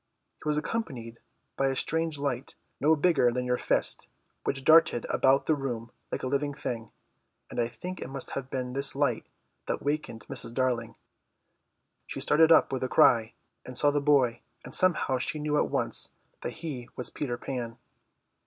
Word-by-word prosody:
He 150 - -2
was 150 - +1
accompanied 130 - -4 0.4
by 135 - +1
a 135 - -1
strange 160 +2 0
light, 140 -2 -3 0.2
no 155 +3 +4
bigger 150 -6 +3
than 125 +1 -2
your 125 0 +1
fist, - - +1 0.4
which 135 -1 -1
darted 155 -6 +5
about 135 +1 +3
the 160 - +3
room 120 -5 -4 0.2
like - - -4
a - - -1
living 140 +1 -1
thing 115 -5 -5 0.6
and - - -4
I 120 - +2
think 180 +10 -8
it - - -6
must 135 -1 -2
have 135 -1 -5
been 125 -2 -4
this 140 +1 +6
light 135 -5 0 0.4
that - - -3
wakened 145 -7 -3
Mrs. 125 -3 -1
Darling. 120 -3 -1 1.1
She - - -5
started 160 +2 +4
up 160 - +5
with 130 - -2
a 130 - -1
cry, 115 -1 +4 0.3
and 125 - -7
saw 145 - +5
the 145 0 0
boy, 140 -5 +2 0.2
and - - -10
somehow 165 -8 +3
she 155 - 0
knew 150 0 -1
at - - 0
once - - +2 0.3
that - - -4
he 130 -7 -6
was 125 - -2
Peter 125 -5 -3
Pan. 120 -3 -5
135 Hz, 180 wpm, -28 LUFS, 125-150 Hz, 1.1 s, this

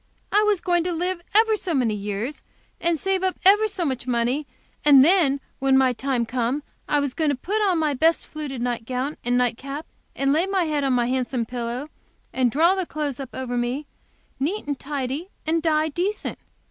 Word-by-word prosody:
I 415 - +5
was 420 -3 +2
going 350 -2 +2
to 360 - 0
live 350 +1 -2
ever 440 0 +5
so 375 -5 -3
years, 215 +1 -1 0.4
and 335 -2 +1
save 385 +2 0
up 375 -1 0
ever 415 +3 +6
so 385 -4 -3
much 260 -3 -3
money, 250 +4 0 0.4
and 280 -3 +8 0.6
when 270 0 +4
my 260 -1 +4
time 255 -1 -1
come, 250 +4 -1 0.3
I 295 - +3
was 285 -3 -1
going 315 0 +1
to 285 - +1
put 410 +11 -2
on 360 - +2
my 310 -2 +1
best 320 +5 +2
fluted 280 -5 -5
night 240 -2 -2
gown 260 +4 -2
and 245 +1 +1
night 245 -2 +1
cap, 280 +3 -6 0.3
and 275 0 +2
lay 330 +5 +2
my 390 -2 +1
head 300 -3 -1
on 270 -1 +2
my 245 -1 +2
handsome 250 -1 -1
pillow, 245 +3 -4 0.5
and 255 -2 +2
draw 330 +7 +4
the 380 -3 -2
clothes 290 -4 -3
up 265 -2 -7
over 255 -2 -3
me, 245 +5 -1 0.5
neat 345 +11 -1
and 285 -2 -3
tidy, 285 +4 -4 0.2
and 325 +1 +1
die 310 -1 +2
decent. 365 +8 -2
285 Hz, 200 wpm, -24 LUFS, 250-340 Hz, 0.6 s, and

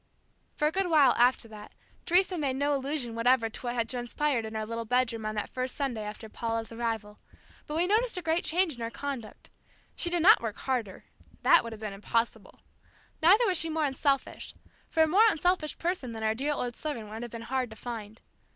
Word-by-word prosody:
For 300 - +2
a - - +1
good 385 +2 0
while 295 -6 +6
after 245 0 +3
that, 210 -1 -11 0.3
Teresa 365 +2 +3
made 280 -6 -1
no 285 +2 +1
allusion 270 -3 -2
whatever 230 0 +2
to - - -7
what 245 -1 -3
had 230 -2 0
transpired 245 +1 -1
in 220 0 -7
our 215 0 -2
little 230 +1 -4
bedroom 230 -2 0
on 215 - -3
that 210 - -3
first 255 0 -3
Sunday 265 -6 -2
after 210 +1 -7
Paula's 225 +1 -3
arrival; 225 -3 -4 0.5
but 300 - -3
we 340 - +3
noticed 440 +3 +1
a 360 - -4
great 325 +1 +1
change 345 -1 +1
in 240 - -10
her 230 - -2
conduct 255 -3 -7 0.4
She 345 - -1
did 345 -2 +1
not 430 +5 +8
work 225 -3 -4
harder 240 -8 -3 0.4
that - - +6
would 230 - -6
have 220 -1 -9
been 210 -2 -4
impossible 225 +2 -2 0.6
neither 395 +9 +6
was 370 -5 +2
she 330 - 0
more 315 -1 0
unselfish, 275 0 -1 0.3
for 320 - +3
a - - +3
more 410 +8 +5
unselfish 355 -3 0
person 335 -9 -2
than 220 0 -6
our 220 0 +2
dear 280 +6 -1
old 245 -4 -3
servant 245 -9 -5
would 220 +2 -7
have 240 - -5
been 230 0 -8
hard 255 0 -2
to 220 - -11
find. 220 -2 -8
250 Hz, 215 wpm, -29 LUFS, 225-310 Hz, 0.6 s, not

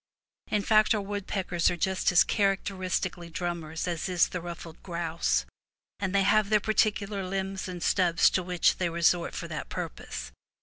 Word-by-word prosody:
In 210 -1 0
fact, 215 +1 +4
our 210 - -1
woodpeckers 195 -3 -1
are 175 - -2
just 190 +2 +1
as 175 - +6
characteris 195 -2 0
tically 175 -2 -6
drummers 170 -2 -3
as 175 +1 -2
is 180 -2 +3
the 180 - -4
ruffled 170 -1 -8
grouse, 165 - -1 0.5
and 195 -2 -1
they 195 - +4
have 205 +1 +3
their 215 -1 +4
particular 210 -1 0
limbs 190 +1 -3
and 180 -2 -6
stubs 175 -3 +4
to 185 - +1
which 180 -1 +2
they 175 -2 0
resort 170 +1 +1
for - - -4
that - - -5
purpose. - - -6
185 Hz, 170 wpm, -28 LUFS, 170-200 Hz, 0.5 s, as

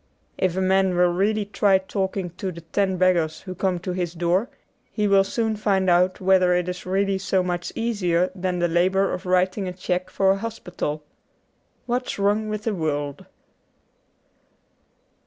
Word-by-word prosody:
If 185 -1 0
a - - +1
man 190 -1 +2
will 175 0 +4
really 205 +3 +1
try 200 -1 +3
talking 190 -1 -3
to 185 +2 -5
the 170 -1 -10
ten 190 +3 -1
beggars 175 -4 +2
who 185 - -7
come 185 0 -1
to 185 - -3
his 180 -2 -3
door 175 +6 +1 0.4
he 210 -2 0
will 195 -1 +5
soon 220 +2 -1
find 195 -3 +1
out 180 +1 +3
whether 185 -1 +4
it 180 0 0
is 180 0 -5
really 195 +1 +1
so 190 -1 +1
much 180 -1 -3
easier 185 -6 0
than 185 -1 -2
the 175 0 +1
labour 185 +3 +2
of 180 +1 -5
writing 185 +2 +1
a 180 - -4
cheque 180 0 -2
for 190 -1 +2
a 195 - +1
hospital. 180 -8 -5 0.4
' - - -43
What's 250 +1 -2
Wrong 205 +2 +1
with 215 0 -4
the 225 - -1
World.'' 145 -5 -3
185 Hz, 175 wpm, -23 LUFS, 180-195 Hz, 0.4 s, will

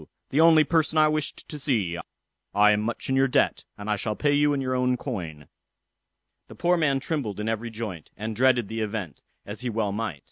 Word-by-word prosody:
the 145 - +3
only 160 -1 +7
person 160 0 +1
I 155 0 +6
wished 155 -1 -3
to 150 - -7
see: 110 - 0 0.6
I 105 +1 +6
am 105 0 +2
much 115 +1 -3
in 135 - +1
your 135 0 +4
debt, 125 - +1
and 105 - -8
I 105 -1 +1
shall 105 +1 -2
pay 145 +4 +1
you 145 +1 +3
all 145 - +2
in - - -1
your 130 -1 -1
own 125 0 +1
coin." 80 - -6 1.0
The - - -12
poor 175 +1 +2
man 145 -5 +2
trembled 135 - -3
in 105 - -3
every 115 +1 -2
joint, 110 -8 -6
and 110 +1 -4
dreaded 125 -3 +3
the 110 +1 -4
event, 105 -6 -4 0.2
as 105 +4 -7
he 125 - -2
well 110 -3 -1
might. 105 -7 -3
115 Hz, 220 wpm, -26 LUFS, 105-145 Hz, 1.0 s, only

